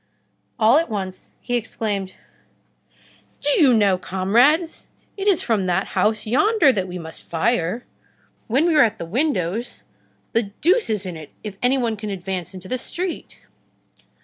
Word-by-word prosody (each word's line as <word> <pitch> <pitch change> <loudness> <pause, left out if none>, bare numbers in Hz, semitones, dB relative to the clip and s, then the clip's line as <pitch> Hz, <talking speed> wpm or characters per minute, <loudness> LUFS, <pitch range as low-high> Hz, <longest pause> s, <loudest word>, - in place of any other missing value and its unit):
All 225 +3 +5
at 330 - -2
once 190 -3 -5
he 245 - -5
exclaimed:— 205 -4 -3 1.2
"Do 290 - +1
you 275 -4 +6
know, 200 -5 +3
comrades, 240 - +2 0.3
it 395 0 -4
is 390 -5 +3
from 210 -5 0
that 180 +2 0
house 215 0 +1
yonder 305 - +4
that 190 -4 -2
we 180 0 -6
must 160 -2 -9
fire. 180 +4 0 0.6
When 265 +8 +2
we 345 - +3
are 300 - +6
at 220 -1 0
the - - -5
windows, 225 - -2 0.5
the 230 -3 +1
deuce 375 - +3
is 210 -3 -1
in 180 -2 -5
it 155 -2 -10
if 210 -2 -6
any 250 +2 +3
one 230 -4 -1
can 210 0 -5
advance 190 -2 -4
into 185 0 -9
the 255 +5 -2
street!" 350 +7 -5
220 Hz, 160 wpm, -22 LUFS, 190-265 Hz, 1.2 s, you